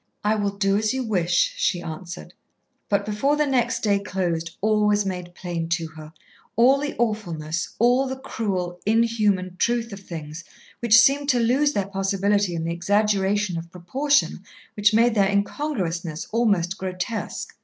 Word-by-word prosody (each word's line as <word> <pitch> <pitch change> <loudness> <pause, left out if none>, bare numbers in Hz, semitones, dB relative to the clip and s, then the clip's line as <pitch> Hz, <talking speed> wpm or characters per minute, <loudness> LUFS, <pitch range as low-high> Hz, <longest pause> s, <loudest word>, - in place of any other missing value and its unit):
"I 210 +1 +2
will 205 -2 0
do 195 0 +2
as 215 +4 0
you 260 - -1
wish," 215 - +1
she 205 - +1
answered. 170 +1 -8 0.6
But 200 0 +1
before 215 +8 +1
the 300 0 +2
next 245 -4 0
day 200 -2 +3
closed 175 -4 -3
all 210 0 +2
was 205 -1 +2
made 180 -2 -5
plain 170 -2 -4
to 165 -1 -1
her, 155 -1 -11 0.4
all 260 +4 +5
the 290 0 -3
awfulness, 170 -8 -2
all 245 +4 +3
the 260 - -3
cruel, 185 -9 -3
inhuman 210 -5 +1
truth 235 +1 0
of 200 - -7
things 160 -3 -8 0.4
which 230 -2 +5
seemed 280 +2 +3
to 250 -3 +3
lose 265 +6 +2
their 200 - 0
possibility 195 -1 0
in 165 - -3
the 165 +1 -2
exaggeration 200 0 +1
of 165 +1 -10
proportion 270 - 0 0.3
which 210 +1 +3
made 230 +2 +4
their 200 -3 +3
incongruousness 190 - -2
almost 200 -6 +1
grotesque. 190 +4 -4
205 Hz, 160 wpm, -23 LUFS, 175-230 Hz, 0.6 s, all